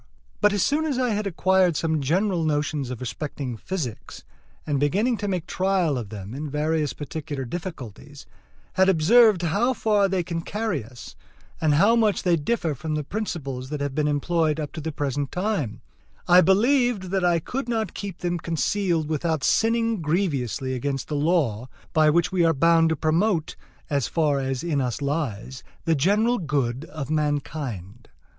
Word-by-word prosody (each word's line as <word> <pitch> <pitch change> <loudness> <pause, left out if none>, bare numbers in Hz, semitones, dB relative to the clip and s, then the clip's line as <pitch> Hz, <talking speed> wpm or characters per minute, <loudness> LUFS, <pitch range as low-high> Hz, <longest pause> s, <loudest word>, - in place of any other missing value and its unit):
But 210 - +4
as 205 -2 +1
soon 310 +2 +1
as 285 -5 -1
I 255 -1 +1
had 210 -1 -1
acquired 185 -2 +2
some 160 -2 0
general 175 +5 +1
notions 150 -3 -1
respecting 125 +1 -5
physics, 145 - -6 0.4
and 145 -3 0
beginning 200 - +2
to 205 - -3
make 180 -4 -2
trial 185 -4 +1
of 115 -5 -4
them 100 0 -8
in 150 +3 -5
various 150 +1 0
particular 145 -2 -5
difficulties, 145 - -8 0.5
had 190 0 +4
observed 195 +3 +5
how 205 +10 +1
far 210 -3 +2
they 190 -2 0
can 165 0 -3
carry 205 - -2
us, 120 +2 -12 0.5
and 155 -2 +3
how 205 +9 +5
much 220 -3 +2
they 175 -2 +3
differ 165 0 -1
from 155 +3 -4
the 150 - -2
principles 140 -9 -4
that 150 0 -4
have 140 -1 -2
been 150 +1 0
employed 155 +1 +1
up 150 -2 -4
to 160 - -7
the 160 +2 -3
present 145 -1 -2
time, 175 - -2 0.5
I 180 0 +7
believed 220 0 +2
that 190 -1 0
I 175 -1 +3
could 245 - -4
not 225 -2 -1
keep 195 -4 -7
them 175 -1 -1
concealed 170 0 0
without 160 -1 -1
sinning 230 -2 +2
grievously 145 - -1
against 135 +1 -3
the 150 - -2
law 145 - +1 0.2
by 155 -1 +5
which 170 +2 +2
we 185 -2 +2
are 165 -1 +3
bound 165 +3 +4
to 160 - +1
promote, 160 +3 0 0.3
as 140 -4 0
far 150 -4 +1
as 135 -1 -2
in 155 -5 0
us 125 0 -2
lies, 135 -4 -3 0.2
the 165 - +3
general 210 - +2
good 140 -4 -1
of 155 -3 -6
mankind. 140 - -3
160 Hz, 170 wpm, -24 LUFS, 140-190 Hz, 0.5 s, I